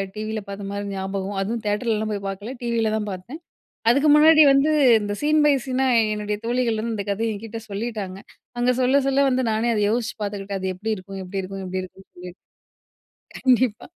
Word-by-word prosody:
டிவில 215 0 -4
பார்த்த 200 0 -6
மாரி 200 0 -4
ஞாபகம். 195 +1 -4
அதுவும் 225 +4 -2
தியேட்டர்லலாம் 215 0 -1
போய் 200 -1 -5
பார்க்கல 205 +6 -6
டிவில 230 -2 0
தான் 210 -1 -3
பார்த்தேன். 230 - -8 0.5
அதுக்கு 280 +6 +4
முன்னாடி 310 +1 +7
வந்து 275 +3 +3 0.3
இந்த 205 -1 -3
சீன் 305 +1 +3
பை 295 - +5
சீனா 265 0 0 0.3
என்னுடைய 210 0 -3
தோழிகள் 235 -2 0
வந்து 230 +1 -3
இந்த 200 -2 -3
கதைய 220 +3 -1
என்கிட்ட 225 +2 -7
சொல்லிட்டாங்க. 200 -2 -4 0.4
அவுங்க 245 +1 +2
சொல்ல 260 +3 +4
சொல்ல 275 +1 +3
வந்து 260 0 +1
நானே 220 +2 0
அத 210 - 0
யோசிச்சு 235 0 -2
பார்த்துக்கிட்டேன் 200 -1 -4
அது 190 0 -2
எப்டி 210 +5 -4
இருக்கும் 195 +1 -8
எப்டி 190 +1 -4
இருக்கும் 195 +1 -7
எப்டி 185 +1 -3
இருக்குன்னு 190 +1 -13
சொல்லி 180 0 -9 1.1
கண்டிப்பா 250 -4 +2
215 Hz, 180 wpm, -23 LUFS, 195-245 Hz, 1.1 s, முன்னாடி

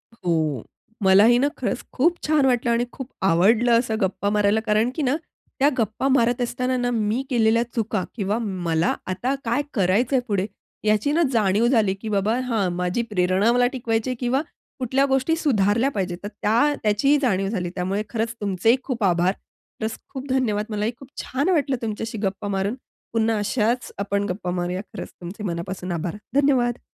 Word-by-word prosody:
हो. 155 - -1 0.4
मलाही 205 +5 +6
ना, 280 - +3
खरंच - - -2
खूप 335 +7 +3
छान 300 -3 +3
वाटलं 245 -2 +2
आणि 235 +1 +2
खूप 265 -1 -7
आवडलं 220 +7 +4
असं 230 -2 -1
गप्पा 195 +1 0
मारायला, 210 +1 +2
कारण 215 +2 +2
की 320 - -2
ना, 270 0 +2 0.4
त्या 280 - +5
गप्पा 225 +3 0
मारत 245 -2 +2
असताना 250 +1 -1
ना, 245 0 0
मी 220 +2 0
केलेल्या 230 -2 +3
चुका 215 -4 -1
किंवा 205 -1 -1
मला 175 -6 0 0.2
आता 245 +9 -1
काय 235 +5 +1
करायचंय 225 +6 +2
पुढे? 200 -3 0 0.4
ह्याची 215 +6 +2
ना 335 +3 +2
जाणीव 215 +1 +3
झाली, 220 -6 +3
की 215 +3 -7
"बाबा, 210 +3 +1
हा 220 -6 +1
माझी 180 +5 -1
प्रेरणा 185 +3 +2
मला 245 0 +4
टिकवायची 230 -1 -1
आहे" 255 - -1
किंवा 255 +2 +1 0.4
कुठल्या 260 +2 +2
गोष्टी 270 +4 +1
सुधारल्या 235 -5 +2
पाहिजेत 185 -6 -2
तर - - -3
त्या 240 +8 +3
त्याची 220 +8 +3
जाणीव 195 -6 +1
झाली. 180 -5 -2
त्यामुळे 190 +3 -1
खरंच 230 0 -2
तुमचेही 205 +4 +2
खूप 245 -5 -3
आभार. 180 0 +3 0.5
प्लस 220 +1 -3 0.2
खूप 265 +1 -6
धन्यवाद. 225 -6 +1
मलाही 210 +1 -1
खूप 270 - -12
छान 280 +8 -1
वाटलं 290 -6 +2
तुमच्याशी 225 0 -4
गप्पा 195 +1 -2
मारून. 195 +3 -1 0.4
पुन्हा 225 -1 +2
अशाच 225 +3 0
आपण 200 0 -1
गप्पा 180 -1 -3
मारूया 180 +1 -2
खरंच - - -7
तुमचे 185 +5 -7
मनापासून 180 0 -4
आभार. 170 +3 -3 0.2
धन्यवाद. 250 -4 +2
220 Hz, 170 wpm, -23 LUFS, 195-245 Hz, 0.5 s, मलाही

